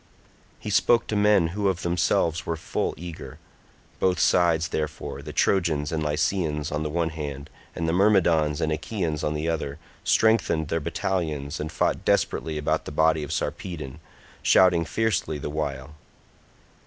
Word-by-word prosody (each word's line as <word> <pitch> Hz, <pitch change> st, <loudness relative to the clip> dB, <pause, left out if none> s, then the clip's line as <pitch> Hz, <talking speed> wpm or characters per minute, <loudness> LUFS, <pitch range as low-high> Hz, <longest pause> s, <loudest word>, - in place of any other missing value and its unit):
He -, -, -5 dB
spoke 120 Hz, -1 st, +3 dB
to 110 Hz, -, -3 dB
men 105 Hz, -5 st, +4 dB
who 100 Hz, +3 st, -1 dB
of 95 Hz, -2 st, -1 dB
themselves 85 Hz, -1 st, +1 dB
were 85 Hz, -, -2 dB
full 80 Hz, -, -2 dB
eager; 85 Hz, -1 st, -8 dB, 0.6 s
both 90 Hz, -2 st, +2 dB
sides, 85 Hz, -2 st, +3 dB
therefore, 75 Hz, 0 st, -4 dB
the -, -, -8 dB
Trojans 80 Hz, -6 st, +1 dB
and 80 Hz, -1 st, -1 dB
Lycians 75 Hz, +1 st, -1 dB
on 75 Hz, -, -1 dB
the 75 Hz, -, -2 dB
one 80 Hz, +1 st, -1 dB
hand, 75 Hz, -2 st, -6 dB, 0.2 s
and 80 Hz, -, -2 dB
the 80 Hz, -, +1 dB
Myrmidons 85 Hz, -6 st, +3 dB
and 80 Hz, -, 0 dB
Achaeans 80 Hz, -2 st, -2 dB
on 75 Hz, -, -1 dB
the 75 Hz, +2 st, -2 dB
other, 75 Hz, -4 st, -2 dB, 0.3 s
strengthened 95 Hz, -9 st, +2 dB
their 80 Hz, -, 0 dB
battalions, 80 Hz, -3 st, -2 dB
and 75 Hz, +1 st, -4 dB
fought -, -, 0 dB
desperately 80 Hz, -1 st, 0 dB
about 75 Hz, -, -1 dB
the -, -, -6 dB
body 80 Hz, +1 st, +2 dB
of 75 Hz, -, -5 dB
Sarpedon, 75 Hz, -5 st, -4 dB, 0.4 s
shouting 90 Hz, -3 st, +4 dB
fiercely 105 Hz, -6 st, -1 dB
the 75 Hz, +1 st, -5 dB
while. 70 Hz, -2 st, -4 dB
80 Hz, 155 wpm, -25 LUFS, 75-90 Hz, 0.6 s, men